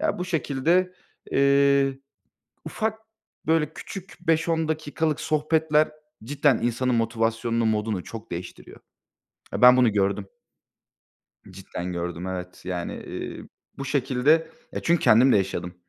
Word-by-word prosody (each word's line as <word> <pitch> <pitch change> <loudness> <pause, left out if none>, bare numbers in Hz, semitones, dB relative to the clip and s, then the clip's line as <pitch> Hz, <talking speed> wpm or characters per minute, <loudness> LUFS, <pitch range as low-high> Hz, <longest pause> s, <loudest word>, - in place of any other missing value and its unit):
Ya 310 -9 0
bu 180 - -2
şekilde, 170 +3 +1 0.4
eee, 140 0 +3 0.7
ufak, 220 0 -2 0.5
böyle 160 -1 +2
küçük, 195 -1 -9
5-10 165 0 +1
dakikalık 155 0 -1
sohbetler 155 0 +2 0.3
cidden 140 -1 +2
insanın 120 +2 0
motivasyonunu, 115 0 0
modunu 105 -3 -1
çok 115 0 -9
değiştiriyor. 85 +1 -8 0.7
Ya, - - -3
ben 125 0 +9
bunu 125 -4 +4
gördüm. 100 0 0 1.2
Cidden 90 -1 -6
gördüm, 85 0 -4
evet. 90 -1 -6
Yani, 90 -1 -4
eee, - - -7 0.4
bu 140 - -4
şekilde. 140 +4 +2 0.2
Ya, - - -3
çünkü 170 -1 +2
kendim 125 +4 +6
de - - +5
yaşadım. 95 -2 -2
130 Hz, 120 wpm, -25 LUFS, 110-155 Hz, 1.2 s, ben